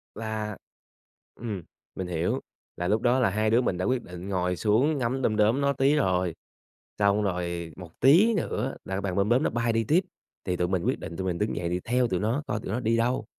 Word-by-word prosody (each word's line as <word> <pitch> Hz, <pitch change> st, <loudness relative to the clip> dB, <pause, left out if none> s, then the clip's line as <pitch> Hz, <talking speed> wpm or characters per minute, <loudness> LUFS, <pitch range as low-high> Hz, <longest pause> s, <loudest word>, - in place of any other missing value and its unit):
Là 110 Hz, -2 st, -4 dB, 0.8 s
ừm, 105 Hz, -6 st, -5 dB, 0.3 s
mình 95 Hz, -, -4 dB
hiểu. 85 Hz, 0 st, -1 dB, 0.4 s
Là 90 Hz, -, -2 dB
lúc 110 Hz, +2 st, +1 dB
đó 125 Hz, +1 st, +3 dB
là 120 Hz, -7 st, +3 dB
hai 110 Hz, +2 st, +1 dB
đứa 115 Hz, +3 st, +4 dB
mình 105 Hz, -7 st, 0 dB
đã 90 Hz, -, -1 dB
quyết 125 Hz, -2 st, +1 dB
định 90 Hz, +2 st, -8 dB
ngồi 90 Hz, -2 st, 0 dB
xuống 125 Hz, -, +2 dB
ngắm 130 Hz, +2 st, -1 dB
đom 110 Hz, -3 st, +1 dB
đóm 110 Hz, +6 st, +3 dB
nó 140 Hz, 0 st, +2 dB
tí 135 Hz, +2 st, +3 dB
rồi 90 Hz, -, +1 dB, 0.6 s
xong 100 Hz, +1 st, +3 dB
rồi 85 Hz, -3 st, -2 dB
một 85 Hz, -3 st, -12 dB
tí 180 Hz, -, +6 dB
nữa 135 Hz, -, -2 dB
là 95 Hz, -, -4 dB
cái 95 Hz, -, -1 dB
bàn 95 Hz, -1 st, -3 dB
đom 100 Hz, +1 st, +2 dB
đóm 125 Hz, +4 st, +3 dB
nó -, -, +1 dB
bay 115 Hz, -1 st, 0 dB
đi 115 Hz, 0 st, +1 dB
tiếp 160 Hz, -, +4 dB, 0.4 s
thì 90 Hz, -1 st, -1 dB
tụi 90 Hz, 0 st, 0 dB
mình 95 Hz, -2 st, 0 dB
quyết -, -, 0 dB
định 85 Hz, -, -7 dB
tụi 95 Hz, -, -3 dB
mình 90 Hz, -2 st, -1 dB
đứng 105 Hz, -, -1 dB
dậy 85 Hz, -, -2 dB
đi 90 Hz, +1 st, -1 dB
theo 125 Hz, +1 st, +2 dB
tụi 90 Hz, -2 st, -1 dB
nó 115 Hz, +8 st, 0 dB
coi 105 Hz, -5 st, -2 dB
tụi -, -, -5 dB
nó 120 Hz, -, -1 dB
đi 115 Hz, 0 st, +1 dB
đâu, 120 Hz, +3 st, +1 dB
105 Hz, 240 wpm, -27 LUFS, 90-125 Hz, 0.8 s, tí